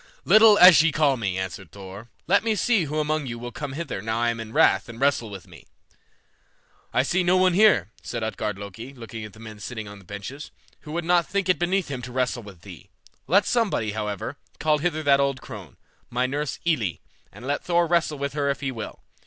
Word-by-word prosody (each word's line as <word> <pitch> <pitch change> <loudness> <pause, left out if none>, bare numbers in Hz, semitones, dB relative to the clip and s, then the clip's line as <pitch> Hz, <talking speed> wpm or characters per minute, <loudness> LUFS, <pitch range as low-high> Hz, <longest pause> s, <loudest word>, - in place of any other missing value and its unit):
"Little 215 -1 +7
as 180 -6 +9
ye 165 0 +3
call 145 -2 +2
me," 100 -6 -2
answered 95 -1 -5
Thor, 100 +3 -10 0.2
"let 200 +5 +3
me 225 -1 +1
see 205 -2 +2
who 150 +1 -4
among 155 -1 -1
you 120 -1 -5
will 120 +1 -7
come 145 0 -6
hither 150 -9 -4
now 110 +2 -2
I 120 0 +2
am 115 - -6
in 110 -1 -7
wrath - - +3
and 115 0 -9
wrestle 135 -5 +1
with 95 -3 -9
me." - - -15 1.2
"I 125 - +2
see 180 +7 +1
no 180 +1 +3
one 185 -1 +4
here," 180 - +4
said 115 -2 -5
Utgard 105 -2 -3
Loki, 105 +7 -9
looking 115 -2 -8
at 105 - -11
the 110 - -15
men 110 -2 -10
sitting 110 0 -6
on 100 0 -10
the - - -17
benches, 100 +10 -8 0.3
"who 150 - -11
would 170 0 -2
not 175 -1 +3
think 200 -1 -1
it 185 - +3
beneath 180 0 0
him 130 -3 -4
to 125 +1 -8
wrestle 125 -1 -1
with 100 -6 -13
thee; 90 -7 -12 0.4
let 195 +7 +4
somebody, 215 - 0
however, 105 -2 -4 0.2
call 150 -1 +2
hither 155 0 -1
that 140 -1 +4
old 140 -1 +1
crone, - - -10 0.3
my 125 +1 0
nurse 145 +2 -3
Elli, 115 - 0 0.3
and 105 +5 -12
let 145 +1 -2
Thor 175 -1 +2
wrestle 170 -3 +1
with 140 0 -3
her 145 -1 0
if 140 - -2
he 135 -2 -2
will. 115 -4 -8
135 Hz, 225 wpm, -24 LUFS, 110-165 Hz, 1.2 s, as